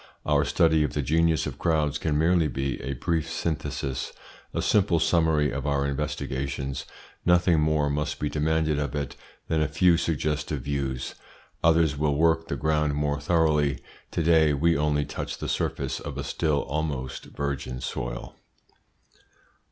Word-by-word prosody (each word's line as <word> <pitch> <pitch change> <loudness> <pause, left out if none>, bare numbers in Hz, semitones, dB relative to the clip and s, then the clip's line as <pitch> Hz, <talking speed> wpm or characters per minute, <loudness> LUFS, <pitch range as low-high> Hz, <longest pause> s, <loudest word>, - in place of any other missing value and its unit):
Our - - +3
study 80 -2 +3
of 75 - -2
the 75 - -1
genius 80 +2 +2
of - - -6
crowds 75 -3 +1
can 75 -1 0
merely 85 +1 +3
be 65 -2 -3
a 70 +2 -3
brief 80 +4 -1
synthesis, 75 -4 -3 0.4
a - - -2
simple 95 -5 +3
summary 80 -3 +2
of - - -3
our 70 -1 +1
investigations. 70 -1 -3 0.4
Nothing 90 -2 +4
more 75 -1 +2
must 75 +1 -2
be 75 - 0
demanded 75 0 +1
of 75 0 -2
it 70 -3 -3 0.3
than 80 -1 +1
a 75 - +2
few 85 +3 +4
suggestive 75 -2 -1
views. 70 -2 -2 0.5
Others 80 -3 +3
will 75 -1 +2
work 80 +1 +2
the - - -2
ground 75 -1 +1
more 75 0 0
thoroughly. 75 -3 +2 0.3
To 85 - -1
day 80 -2 +5
we 85 +4 +3
only 75 0 +1
touch - - -5
the - - -5
surface - - -2
of - - -6
a - - -3
still 75 -4 0
almost 70 -3 -3
virgin 70 -3 -4
soil. - - -5
75 Hz, 155 wpm, -26 LUFS, 70-80 Hz, 0.5 s, day